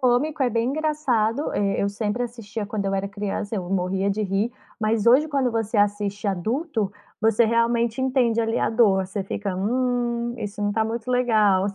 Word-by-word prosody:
cômico, 270 +4 +2
é 255 - +3
bem 230 +1 0
engraçado, 290 -5 0
eh, 200 -1 0
eu 200 - +1
sempre 210 +3 -2
assistia 225 -3 -5
quando 205 0 -3
eu 195 - 0
era 195 0 -1
criança, 205 +1 -4
eu 185 -4 -3
morria 190 +1 0
de 215 +2 -1
rir, 200 +4 0 0.3
mas 215 0 +1
hoje 260 +6 +6
quando 275 -4 +1
você 225 -1 -2
assiste 205 0 0
adulto, 220 - -1 0.3
você 225 +1 +4
realmente 230 +1 +1
entende 255 -3 +2
ali 225 0 0
a - - +1
dor, 205 -5 +3
você 195 +1 -4
fica: 200 0 -3
"Hum, 240 +2 0
isso 205 -1 -5
não 205 0 +1
tá 220 +1 +1
muito 225 +2 -4
legal". 215 -6 +3
Você 200 - -6
225 Hz, 190 wpm, -24 LUFS, 200-245 Hz, 0.3 s, hoje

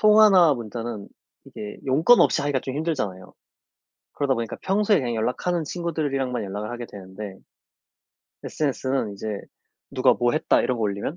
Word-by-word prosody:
통화나 210 -7 +6
문자는 115 -3 -6 0.4
이게 105 -1 -8
용건 155 - +5
없이 - - +4
하기가 145 -2 0
좀 130 +1 -5
힘들잖아요. 130 - -3 0.8
그러다 140 -2 0
보니까 115 -2 -4
평소에 205 +1 +2
그냥 120 -5 -2
연락하는 155 +10 -1
친구들이랑만 145 -7 -2
연락을 105 +2 -5
하게 120 0 -6
되는데 95 0 -9 1.1
SNS 140 -3 -2
는 130 -6 0
이제 105 +1 -4 0.5
누가 - - +4
뭐 120 0 +1
했다 155 - +2
이런 125 - 0
거 115 - -3
올리면 105 +9 -2
130 Hz, 360 characters per minute, -24 LUFS, 110-155 Hz, 1.1 s, 통화나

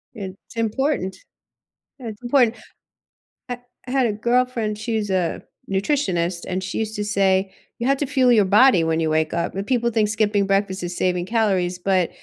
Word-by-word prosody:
It's 195 +2 -9
important 230 -2 -1 0.8
Yeah, 240 - -7
it's 210 +2 -10
important, 240 -2 +3 0.9
ha 245 - -3 0.3
I 250 - -5
had 265 -2 +2
a 210 - -1
girlfriend, 235 -1 0
she's 215 -2 -2
a 185 -3 0 0.3
nutritionist, 190 - 0
and 185 +1 -2
she - - -4
used 220 -1 -3
to 210 - -2
say, 195 -2 +2 0.3
“You 235 - -2
have 275 0 +3
to 290 - 0
fuel 260 -2 +3
your 210 -4 +5
body 210 -1 +5
when 160 0 0
you 160 -1 0
wake 155 0 +1
up.” 170 0 -1
And 195 +1 -3
people 240 -2 +1
think 215 -2 +1
skipping 210 -2 +1
breakfast 195 -1 0
is 175 0 -4
saving 180 -1 0
calories, 190 -6 +1
but 185 -2 +1
205 Hz, 180 wpm, -22 LUFS, 185-235 Hz, 0.9 s, your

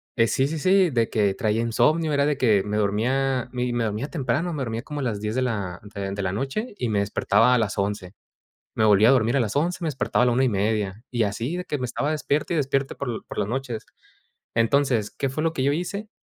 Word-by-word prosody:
eh, 115 -2 +3
sí, 135 - +1
sí, 160 +2 -3
sí, 185 +1 +4
de 115 -3 +1
que 100 -3 +1
traía 110 0 0
insomnio. 150 +7 +2
Era 140 0 +2
de 150 - 0
que 110 -7 +3
me 105 +1 -2
dormía, 125 +5 0
mi 125 -1 -2
me 120 -1 0
dormía 110 +6 -2
temprano. 155 +3 -1
Me 145 - -4
dormía 115 -2 -3
como 145 0 -6
a - - -2
las 110 -5 -2
10 105 +1 -3
de 130 - 0
la 100 -8 -2
de 100 -1 -3
de 100 +1 -3
la 90 -1 -1
noche 135 - -3
y 125 - -2
me 105 -2 +1
despertaba 105 +4 +3
a - - +4
las 110 -3 0
11. 100 -1 -2 0.6
Me 110 - +2
volvía 105 +2 +6
a - - +7
dormir 120 -1 +3
a - - +3
las 110 -4 -1
11, 170 +5 0
me 165 - -1
despertaba 135 -4 0
a - - +4
la - - +3
1:30 105 -3 0
y 120 -3 0
así 115 - -2
de 180 - -4
que 150 - -3
me 125 - -1
estaba 140 +5 -2
despierte 150 +1 -1
y - - +1
despierte 135 -1 0
por 120 -5 -5
por - - -9
las - - 0
noches. 120 -1 -4 0.7
Entonces, 115 -1 +2
¿qué 135 - -2
fue 135 +4 -3
lo 165 - +2
que 130 - -1
yo 140 - +2
hice? 200 +6 -4
125 Hz, 250 wpm, -24 LUFS, 110-140 Hz, 0.7 s, a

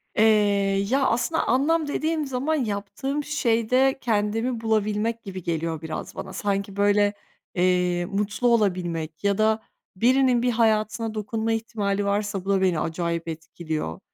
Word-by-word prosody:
Eee, 215 - +4 0.7
ya, 270 +2 +2
aslında 260 +8 0
anlam 300 +6 +2
dediğim 310 +1 -1
zaman 270 +4 -1
yaptığım 265 +4 -2
şeyde 255 -2 +2
kendimi 225 +2 0
bulabilmek 220 +1 0
gibi 190 -3 -7
geliyor 165 -1 -2
biraz 160 -1 -6
bana. - - -7
Sanki, 200 -1 -2
böyle, 205 0 +3 0.4
eee, 180 -1 +2
mutlu 210 +5 -1
olabilmek 175 -8 0
ya 200 -1 +2
da 220 0 +2 0.3
birinin 250 +3 +3
bir 250 0 +2
hayatına 220 -1 +1
dokunma 220 +1 -2
ihtimali 210 -3 -1
varsa, 200 -1 -1
bu - - -4
da 195 -1 +3
beni 180 -4 +2
acayip 170 +1 -2
etkiliyor. 160 - -5
210 Hz, 135 wpm, -24 LUFS, 185-240 Hz, 0.7 s, Eee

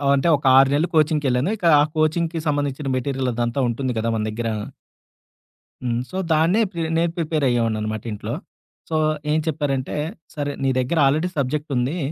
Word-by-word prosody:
అంటే 140 +4 +1
ఒక 140 - -6
6 135 0 +6
నెలలు 150 +4 +2
కోచింగ్‌కెళ్ళాను. 150 -2 +2
ఇక 190 - -5
ఆ - - +5
కోచింగ్‌కి 160 +2 +1
సంబంధించిన 145 -1 -1
మెటీరియల్ 130 0 -1
అదంతా 120 +3 -1
ఉంటుంది 125 +2 -2
కదా! 115 +1 0
మన 110 - -1
దగ్గర. 115 +2 -3 1.3
హ్మ్. 120 -1 0
సో 185 - -5 0.2
దాన్నే 165 +8 +3
ప్రి 170 -3 -4 0.2
నేను 170 0 +1
ప్రిపేర్ 155 -3 0
అయ్యేవాడిననమాట 110 -3 -1
ఇంట్లో. 105 - -5 0.6
సో 160 - 0 0.3
ఏం 155 - +3
చెప్పారంటే 140 -4 -1 0.4
సరే 145 -1 -2
నీ 135 - +2
దగ్గర 130 +7 -1
ఆల్రెడీ 155 +6 +2
సబ్జెక్టుంది. 140 +1 -1
140 Hz, 155 wpm, -22 LUFS, 125-155 Hz, 1.3 s, 6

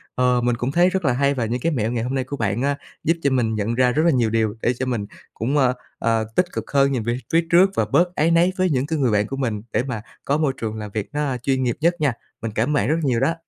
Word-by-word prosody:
Ờ, 125 -1 +2
mình 120 0 +1
cũng 125 +3 -2
thấy 175 +3 +4
rất 185 -3 -2
là 130 - +3
hay, 140 +2 +2
và 125 -4 -1
những 120 +3 -2
cái 165 - +1
mẹo 115 -4 -1
ngày 115 -2 -1
hôm 125 - -3
nay 130 - 0
của 140 +2 -6
bạn 110 +1 -1
á, 140 0 0 0.3
giúp 165 - +3
cho 140 - +2
mình 115 -4 +1
nhận 110 +2 -1
ra 125 0 +3
rất 155 +5 +1
là 170 - +5
nhiều 120 -4 +2
điều 110 -1 0
để 120 - +2
cho 130 - 0
mình 115 -5 -2 0.3
cũng, 135 +7 -1
ờ, 130 -2 +3 0.3
ờ, 115 -1 +1
tích 180 - +4
cực - - -5
hơn 140 -1 +3
nhìn 120 -5 -1
về 120 +2 -1 0.2
phía 165 0 +3
trước 185 +3 +6
và - - +2
bớt 180 +1 +1
áy 165 +3 +2
náy 170 +2 +4
với 185 -1 +2
những 135 -2 0
cái 160 -2 -1
người 125 -5 +2
bạn 105 0 +2
của 135 - -5
mình, 115 -6 -2
để 115 - +1
mà 125 -5 -4 0.2
có 140 +2 +1
môi 150 -4 +1
trường 110 -1 -3
làm 105 -2 -6
việc 105 -2 -3
nó, 145 - -2
a, 130 -3 -2
chuyên 130 +1 0
nghiệp 120 -2 0
nhất 170 +2 +4
nha. 145 -4 +2 0.3
Mình 115 - -3
cảm 110 +6 0
ơn - - +1
bạn 110 -5 +1
rất 160 - +2
nhiều 125 -4 +1
đó! 135 +5 +2
130 Hz, 310 wpm, -22 LUFS, 115-145 Hz, 0.3 s, trước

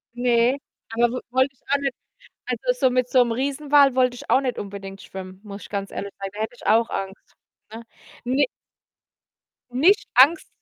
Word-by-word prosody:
Ne, 245 +1 +2 0.4
aber 240 +1 +4
w 250 +1 -4
wollte 260 +2 +2
ich 260 - -35
auch 280 - +4
nicht. 275 -1 -2 0.5
Also, 250 0 -1
so 260 0 +3
mit 250 0 +1
so 260 - +2
'nem 235 - -2
Riesenwal 280 +2 +3
wollte 250 -1 +2
ich - - -11
auch 260 - +5
nicht 255 -3 -3
unbedingt 195 -1 -7
schwimmen, 185 0 -9
muss 200 -1 -9
ich - - -11
ganz 200 -1 -4
ehrlich 200 0 -6
sagen. 195 0 -5
Da 210 - -7
hätte 220 +2 -3
ich - - -12
auch 225 +1 +3
Angst, 195 0 -6 0.4
ne? 225 +1 -8 0.4
Ne 255 +3 +2 1.3
Nicht 330 +12 +3
Angst 285 +7 +5
245 Hz, 185 wpm, -23 LUFS, 205-265 Hz, 1.3 s, auch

